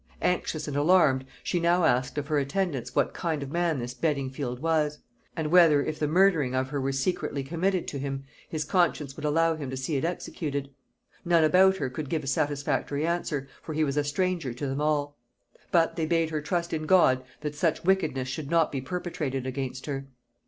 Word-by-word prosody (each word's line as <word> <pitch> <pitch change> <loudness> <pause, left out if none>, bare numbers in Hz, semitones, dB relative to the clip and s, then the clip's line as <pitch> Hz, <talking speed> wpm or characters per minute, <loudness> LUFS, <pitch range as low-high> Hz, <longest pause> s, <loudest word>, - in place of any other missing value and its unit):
Anxious 160 -3 0
and 145 - -4
alarmed, 145 -4 +4 0.2
she 175 - 0
now 170 +1 +3
asked 130 -3 +2
of 145 -1 -2
her 150 -2 +2
attendants 140 -1 -2
what - - +2
kind 160 -5 -2
of 135 - -7
man 170 -2 +1
this 120 -1 -4
Beddingfield 135 -4 -2
was; 155 -1 +1 0.4
and 155 -1 -2
whether, 165 -5 +6
if 155 +1 -4
the 150 - +1
murdering 160 -6 +3
of 130 0 0
her 140 0 -2
were 135 +1 0
secretly 140 0 -1
committed 175 +5 -1
to 140 - -5
him, 135 0 -4 0.3
his 155 -1 -2
conscience 150 -5 +1
would 150 - -6
allow 165 +2 +2
him 145 -4 -5
to 130 - -4
see 135 +3 -1
it 135 - -2
executed? 145 -4 -3 0.5
None 170 -2 +4
about 190 +5 +5
her 135 -7 -2
could 145 +1 -5
give 160 -2 -1
a - - -7
satisfactory 145 +1 0
answer, 165 -5 -1
for 160 - -6
he 155 - +2
was 140 -2 -1
a 145 - +2
stranger 150 -3 -1
to 140 - -4
them 135 +1 -2
all; 145 -2 0 0.5
but 165 -2 +3
they 160 -2 -1
bade 165 -1 +1
her 155 -1 -1
trust 170 +3 -2
in 155 -1 -2
God 130 -9 +5 0.2
that 150 -1 -3
such 155 +2 0
wickedness 160 -9 +1
should 140 +2 -5
not 165 -1 +3
be 135 - -3
perpetrated 150 -5 -3
against 130 0 -4
her. 135 -2 -4
150 Hz, 200 wpm, -27 LUFS, 135-170 Hz, 0.5 s, whether